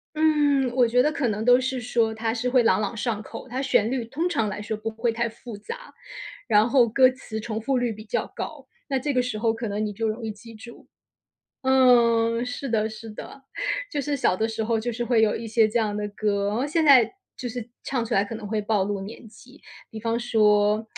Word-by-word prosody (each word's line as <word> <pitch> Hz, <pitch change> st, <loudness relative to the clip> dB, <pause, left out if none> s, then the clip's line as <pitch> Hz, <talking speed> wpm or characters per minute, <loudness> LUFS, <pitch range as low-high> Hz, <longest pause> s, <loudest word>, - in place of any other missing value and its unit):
嗯， 295 Hz, -4 st, +3 dB
我 250 Hz, -2 st, +4 dB
觉 245 Hz, +2 st, +3 dB
得 300 Hz, -, +2 dB
可 285 Hz, -6 st, -1 dB
能 215 Hz, 0 st, -2 dB
都 245 Hz, +1 st, +6 dB
是 260 Hz, 0 st, -2 dB
说 225 Hz, -1 st, 0 dB
它 225 Hz, +1 st, -2 dB
是 250 Hz, +1 st, -2 dB
会 250 Hz, -1 st, +4 dB
朗 210 Hz, -3 st, +3 dB
朗 205 Hz, -, -3 dB
上 220 Hz, -1 st, -2 dB
口， 255 Hz, -, -9 dB
它 255 Hz, +3 st, -3 dB
旋 230 Hz, -5 st, +2 dB
律 255 Hz, -2 st, -2 dB
通 290 Hz, +9 st, -2 dB
常 255 Hz, -11 st, 0 dB
来 205 Hz, 0 st, -5 dB
说 220 Hz, +1 st, -4 dB
不 215 Hz, +1 st, -4 dB
会 230 Hz, +2 st, -1 dB
太 235 Hz, +1 st, -1 dB
复 230 Hz, 0 st, -10 dB
杂， 465 Hz, -, -9 dB, 0.5 s
然 215 Hz, 0 st, +4 dB
后 250 Hz, -3 st, +5 dB
歌 255 Hz, +3 st, +5 dB
词 245 Hz, -4 st, -7 dB
重 220 Hz, -1 st, -4 dB
复 255 Hz, +4 st, 0 dB
率 245 Hz, -2 st, 0 dB
比 215 Hz, +1 st, -9 dB
较 -, -, -1 dB
高， -, -, -7 dB, 0.2 s
那 270 Hz, -2 st, 0 dB
这 285 Hz, +2 st, -2 dB
个 250 Hz, -, +3 dB
时 245 Hz, -3 st, -3 dB
候 225 Hz, +1 st, +1 dB
可 230 Hz, +1 st, -4 dB
能 210 Hz, +1 st, -2 dB
你 210 Hz, -, -3 dB
就 225 Hz, +3 st, -2 dB
容 220 Hz, +2 st, -4 dB
易 220 Hz, -, -3 dB
记 225 Hz, +2 st, -13 dB
住。 235 Hz, +2 st, -13 dB, 0.8 s
嗯， 235 Hz, -3 st, +4 dB
是 250 Hz, +2 st, -5 dB
的 220 Hz, -2 st, +1 dB
是 220 Hz, +1 st, -10 dB
的， 270 Hz, +5 st, -10 dB, 0.5 s
就 290 Hz, -, -2 dB
是 285 Hz, 0 st, -2 dB
小 250 Hz, -, +2 dB
的 220 Hz, +2 st, 0 dB
时 220 Hz, 0 st, -3 dB
候 225 Hz, 0 st, 0 dB
就 240 Hz, +2 st, -3 dB
是 240 Hz, +1 st, -3 dB
会 235 Hz, -2 st, +3 dB
有 215 Hz, -, +2 dB
一 230 Hz, -, -6 dB
些 220 Hz, 0 st, +3 dB
这 230 Hz, +2 st, 0 dB
样 210 Hz, -2 st, -1 dB
的 210 Hz, 0 st, -3 dB
歌， 200 Hz, -1 st, -1 dB
然 210 Hz, -, -1 dB
后 260 Hz, +4 st, 0 dB
现 320 Hz, +2 st, +1 dB
在 255 Hz, -6 st, +7 dB, 0.3 s
就 250 Hz, -, -5 dB
是 240 Hz, 0 st, -6 dB, 0.2 s
唱 255 Hz, -4 st, -1 dB
出 225 Hz, -, -6 dB
来 195 Hz, -, +3 dB
可 205 Hz, -, -7 dB
能 220 Hz, -1 st, -7 dB
会 215 Hz, 0 st, -1 dB
暴 210 Hz, -1 st, +1 dB
露 200 Hz, 0 st, -2 dB
年 220 Hz, +3 st, -9 dB
纪。 255 Hz, +7 st, -17 dB, 0.3 s
比 220 Hz, -, -8 dB
方 230 Hz, +1 st, -1 dB
说 210 Hz, -2 st, +3 dB
230 Hz, 260 characters per minute, -25 LUFS, 215-250 Hz, 0.8 s, 在